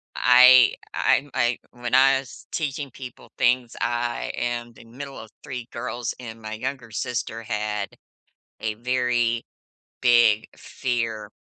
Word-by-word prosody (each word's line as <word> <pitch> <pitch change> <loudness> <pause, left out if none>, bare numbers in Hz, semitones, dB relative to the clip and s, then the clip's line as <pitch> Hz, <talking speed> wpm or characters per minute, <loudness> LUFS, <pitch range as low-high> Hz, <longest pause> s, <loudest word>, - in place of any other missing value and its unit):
I 125 0 +7 0.2
I'm 145 - +2
I 120 0 +1
when 120 0 -6
I 135 +1 +6
was 130 -2 -12
teaching 145 -3 -3
people 125 -1 -11
things 125 -1 +2
I 120 0 -1
am 120 0 -3
the - - -15
middle 135 +4 -9
of 110 - -10
3 125 -5 -6
girls, 120 -1 -4
and 115 -2 -9
my 110 0 -6
younger 125 +1 -5
sister 115 +1 -3
had 105 -2 -2 0.7
a 110 -1 -2
very 120 -1 0 0.6
big 120 -3 +5
fear 115 -5 -3
120 Hz, 130 wpm, -24 LUFS, 115-125 Hz, 0.7 s, I